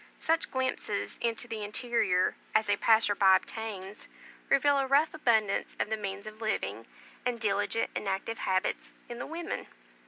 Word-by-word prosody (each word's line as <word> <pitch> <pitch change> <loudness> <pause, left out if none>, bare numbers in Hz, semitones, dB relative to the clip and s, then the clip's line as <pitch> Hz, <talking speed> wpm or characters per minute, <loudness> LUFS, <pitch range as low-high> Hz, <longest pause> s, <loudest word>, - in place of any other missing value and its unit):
Such 325 +1 +1
glimpses 260 -6 -2
into 235 +1 -1
the 220 -2 -4
interior 210 -4 +1 0.2
as 215 -1 +3
a - - +4
passer 220 -2 +4
by 195 -2 +6
obtains, 210 -1 -5 0.4
reveal 280 0 +4
a 270 - 0
rough 285 +4 +3
abundance 225 -9 +1
of 210 - -1
the - - +2
means 200 -1 -5
of 215 +1 -10
living, 215 -1 -2 0.4
and 245 -1 -1
diligent 205 +1 0
and 210 - -3
active 195 +4 -3
habits 185 +1 -1
in 240 0 -7
the - - -5
women. 330 +2 -5
220 Hz, 160 wpm, -30 LUFS, 205-245 Hz, 0.4 s, by